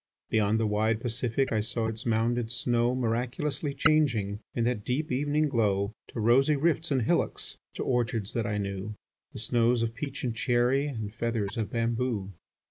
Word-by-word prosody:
Beyond 110 0 +2
the 115 - +1
wide 110 +1 +1
Pacific 120 +2 -1
I 110 - +2
saw 110 +2 -1
its 110 +3 -2
mounded 115 +1 +1
snow 120 0 +1
Miraculously 130 +4 -1
changing 115 -11 +2 0.2
In 120 - +1
that 120 -3 0
deep 130 +7 -1
evening 145 +4 +1
glow, 105 -5 +1
To - - -7
rosy 130 +7 +4
rifts 160 +3 +1
and 130 -4 +1
hillocks, - - -1 0.2
To - - -3
orchards 115 -4 0
that 115 -3 -1
I 105 -1 -1
knew, 100 +1 -4 0.4
The - - -8
snows 115 +1 +2
or 115 - +1
peach 135 +5 -6
and 120 -3 -1
cherry, 125 +3 +2
And 110 -7 -5
feathers 110 -2 -2
of 110 -3 -2
bamboo. 115 -3 -1
115 Hz, 170 wpm, -28 LUFS, 110-130 Hz, 0.4 s, rosy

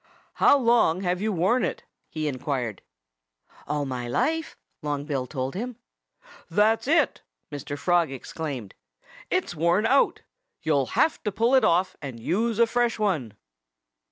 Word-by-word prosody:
"How 285 - +7
long 230 -9 +3
have 180 -1 -1
you 215 +1 0
worn 190 +8 +2
it?" - - -2 0.3
he 155 -1 -3
inquired. 130 -6 -3 0.9
"All 150 0 -1
my 125 -2 -4
life!" 320 - -1 0.2
Long 145 -1 -3
Bill 135 -4 -2
told 130 -1 -3
him. 240 +5 -4 0.7
"That's 220 +4 +2
it!" 310 -2 +2 0.3
Mr. 145 0 -5
Frog 170 -1 +2
exclaimed. 135 -5 -6 0.6
"It's - - 0
worn 170 +7 +2
out. 270 +4 +3 0.4
You'll 140 -4 +2
have 315 - +3
to 210 - 0
pull 230 +6 +1
it 265 - +5
off 180 +3 +2
and 135 -5 -7
use 220 - 0
a 235 - +6
fresh 240 0 0
one." 155 - -1
170 Hz, 145 wpm, -26 LUFS, 140-230 Hz, 0.9 s, How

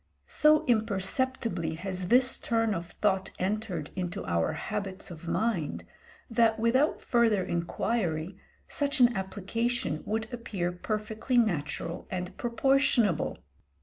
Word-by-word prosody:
So 305 +1 +4
imperceptibly 220 - 0
has 185 +1 -4
this 255 +4 +4
turn 225 -2 +1
of 170 -2 -4
thought 195 -1 0
entered 190 -5 -2
into 180 -2 -3
our 85 -1 0
habits 195 -3 -4
of 170 0 -10
mind, 215 -6 -1 0.4
that, 230 -2 +3
without 255 +7 +2
further 225 -5 +3
inquiry, 170 -1 -1 0.3
such 285 0 -1
an 245 -1 +6
application 200 0 -2
would 220 +1 -1
appear 195 -7 -2
perfectly 215 +6 -2
natural 170 -5 0
and 180 0 -4
proportionable. 240 - +2
210 Hz, 115 wpm, -29 LUFS, 180-235 Hz, 0.4 s, an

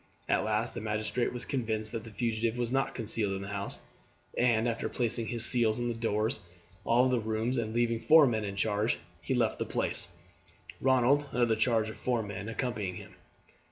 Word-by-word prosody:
At - - +2
last 110 +2 0
the 120 - -5
magistrate 110 +3 -1
was 125 - -4
convinced 110 -4 -1
that 115 -2 -4
the 115 - -9
fugitive 115 +1 -1
was 120 -1 -1
not 135 +1 0
concealed 110 -3 -1
in 95 0 -4
the 100 - -7
house, 100 0 -3 0.5
and, 120 -2 +3
after 115 -1 -2
placing 115 -2 0
his 120 -2 +1
seals 115 -3 +2
on 120 0 -1
the - - -1
doors 110 -1 0
of 105 - -19 0.4
all 125 +2 +5
the 125 -1 +2
rooms 110 +3 -1
and 110 -2 -2
leaving 115 0 +1
four 155 +4 +7
men 110 -4 0
in 100 -1 -4
charge, 105 +2 +1 0.2
he - - -1
left - - +1
the - - +1
place, - - +1 0.7
Ronald, 130 +2 +3
under 120 0 +3
the 115 -1 +2
charge 110 -1 +2
of 110 - -7
four 120 -3 0
men, 100 +1 -6
accompanying 110 -5 -3
him. - - -10
115 Hz, 200 wpm, -30 LUFS, 110-120 Hz, 0.7 s, four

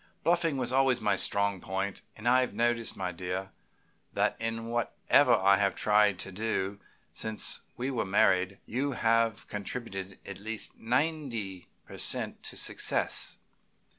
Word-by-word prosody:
Bluffing 170 -4 +2
was 125 -1 -1
always 130 -2 +4
my 105 -3 +2
strong 100 -1 0
point, 95 +1 -3
and 110 +2 -5
I 125 +1 +6
have 125 - -2
noticed, 120 -1 +1
my 90 -2 -2
dear, 90 +2 -4 0.6
that - - +2
in 115 0 -2
whatever 120 +3 +3
I 100 +1 +5
have 100 -1 +1
tried 105 -2 +4
to 100 - -7
do 100 -1 -2 0.3
since 110 -1 -1 0.2
we 130 +3 -2
were 125 - 0
married 95 0 +3
you 135 +4 -1
have 115 -2 +1
contributed 100 -2 -5
at 100 -1 -7
least 110 +1 -3
ninety 120 - -2 0.2
per - - -10
cent. - - -1
to - - -4
success. - - 0
110 Hz, 145 wpm, -30 LUFS, 100-120 Hz, 0.6 s, I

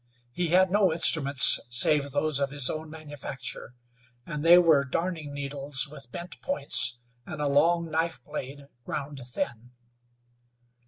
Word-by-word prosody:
He 175 +8 -2
had 185 +2 +2
no 200 -3 +2
instruments, 145 -5 +5
save 140 +4 +3
those 145 +1 -1
of 140 -1 -2
his 140 -2 +2
own 155 0 -8
manufacture, 140 -6 -8 0.5
and 150 -2 -6
they 170 +1 +6
were 160 -5 +3
darning 160 +2 -5
needles 140 0 -1
with 135 -5 -13
bent 175 +5 -10
points, 140 - +2 0.3
and 155 +4 -10
a 145 - -2
long 165 +4 +1
knife 160 -4 -3
blade 140 -1 -9 0.2
ground 140 +2 -7
thin. 120 0 -7
145 Hz, 140 wpm, -25 LUFS, 135-165 Hz, 0.5 s, they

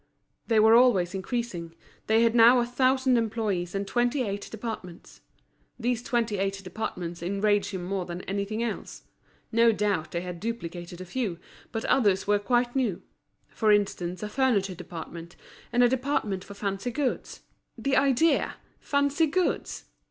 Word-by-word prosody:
They 225 -2 +4
were 220 +1 +6
always 230 -8 +5
increasing, 190 -5 -4 0.3
they 225 +1 +4
had 230 -1 +3
now 235 +1 +7
a 240 - +2
thousand 255 0 +2
employees 210 -6 -2
and 195 +1 -1
twenty 245 +5 +1
eight 200 -2 -4
departments. 215 -6 -8 0.6
These 240 0 0
twenty 230 -4 -1
eight 195 0 -1
departments 180 -4 -5
enraged 200 +3 +1
him 190 -3 -5
more 185 0 -2
than 175 +1 -5
anything 200 +3 -2
else. 235 - -5 0.5
No 230 0 +5
doubt 205 -6 0
they 170 - -3
had 180 -1 -6
duplicated 175 -5 -5
a - - -6
few, 195 -2 -3 0.3
but 225 0 -3
others 205 -7 +3
were 205 0 +3
quite 240 +3 +1
new; 235 -10 0 0.5
for 215 -2 +2
instance 185 -3 0
a - - -2
furniture 210 -6 +1
department, 170 -1 -9 0.4
and 245 +1 +4
a - - +7
department 250 -7 -1
for 200 - -11
fancy 200 +3 -3
goods. 265 +1 -3 0.4
The 275 0 0
idea! 275 +4 +3 0.2
Fancy 285 +3 +1
goods! 360 +4 -1
215 Hz, 150 wpm, -27 LUFS, 185-240 Hz, 0.6 s, now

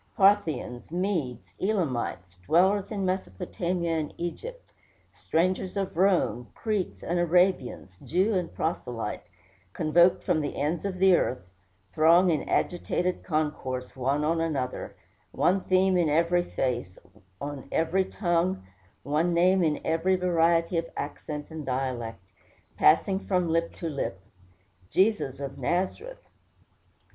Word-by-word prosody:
Parthians, 165 - +2
Medes, 150 - -2
Elamites, 125 - -2
dwellers 190 +4 +3
in 200 -3 -2
Mesopotamia 170 - -2
and 150 - -5
Egypt, 485 - -6 0.4
strangers 185 +3 -1
of 195 -4 -2
Rome, 135 - +2
Cretes 210 -5 -2
and 175 +1 -1
Arabians, 175 - +1
Jew 190 +6 +1
and 180 -3 -1
Proselyte, 125 -8 -3 0.5
convoked 170 +3 +3
from 170 -4 +1
the 145 - -4
ends 155 +5 -1
of 190 -2 -3
the 190 0 +6
earth, 125 - -1 0.5
throng 170 +3 +5
in 155 - -2
agitated 180 +1 0
concourse 150 -6 -2
one 135 +3 0
on 165 +2 +1
another; 140 -6 -3 0.4
one 190 +2 +2
theme 185 0 +3
in 175 -3 +2
every 170 +3 +2
face, 120 - -2 0.4
on 145 -1 -6
every 185 +4 +1
tongue, 175 - 0 0.4
one 155 +5 +1
name 180 +2 +4
in 155 -2 +1
every 165 +4 +2
variety 170 -1 +2
of 165 - -5
accent 150 +1 -5
and 160 -1 -6
dialect 125 -5 -3 0.5
passing 190 +5 +4
from 180 -3 0
lip 165 +1 +1
to 170 - -5
lip 140 -10 -3 0.7
"Jesus 190 - +1
of 140 0 -6
Nazareth." 185 - -2
170 Hz, 125 wpm, -27 LUFS, 140-185 Hz, 0.7 s, the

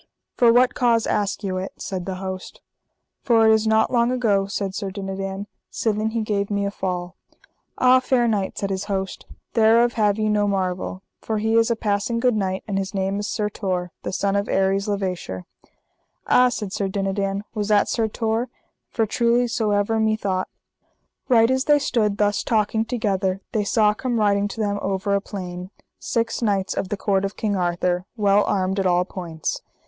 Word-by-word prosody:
For 235 -2 +5
what 245 +2 +4
cause 230 -2 +2
ask 205 0 -1
you 185 -2 -2
it? 185 +1 -4
said 185 -1 -5
the 190 - -3
host. 190 0 -6 0.6
For 225 -2 +4
it 220 - +6
is 220 0 +2
not 220 +2 +3
long 235 0 +3
ago, 210 -6 +1
said 195 -1 -3
Sir 195 0 -3
Dinadan, 195 0 -5 0.3
sithen 215 -1 0
he 230 -1 0
gave 200 -2 -1
me 200 -1 0
a 200 - -2
fall. 180 -2 -4 0.6
Ah, 255 0 +6
fair 255 -2 +2
knight, 205 -4 -1
said 200 -1 -2
his 190 +1 -2
host, 195 -2 -4 0.3
thereof 230 +1 +4
have 210 -2 +2
ye 215 0 0
no 210 -1 +2
marvel, 185 -1 -2 0.2
for 220 - -2
he 220 +1 +1
is 230 +1 +4
a 235 - +2
passing 210 +2 -1
good 245 -1 +2
knight, 190 -2 -1
and 195 -2 -1
his 195 +1 -4
name 195 +1 -1
is 205 0 -3
Sir 210 - -1
Tor, 185 -4 -3
the - - -4
son 200 +1 0
of 200 0 -1
Aries 195 +1 +1
le 205 -1 0
Vaysher. 180 - -4 0.8
Ah, 250 0 +5
said 210 -5 -4
Sir 205 -2 -1
Dinadan, 195 0 -2
was 210 -2 -2
that 210 -1 +3
Sir 225 -2 0
Tor? 225 +2 -1 0.4
for 225 - 0
truly 235 +3 +2
so 225 -2 -1
ever 205 +2 +1
me 220 0 +2
thought. 190 -3 -2 0.8
Right 230 -1 +5
as 260 +1 +1
they 295 -1 +5
stood 215 -7 0
thus 205 0 +1
talking 220 0 +1
together 195 -5 -1
they 215 - 0
saw 210 0 +3
come 240 +1 -2
riding 205 -1 +2
to 205 - -8
them 205 -1 0
over 195 +1 -1
a 200 - +2
plain 180 -3 -7 0.3
six 230 +1 -1
knights 200 -4 0
of 185 - -3
the 205 - -2
court 195 -1 +1
of 195 +1 -4
King 210 -2 -1
Arthur, 180 0 0
well 205 -1 +4
armed 190 0 0
at 190 - +1
all 180 0 +2
points. 170 -5 -4
205 Hz, 195 wpm, -23 LUFS, 195-225 Hz, 0.8 s, it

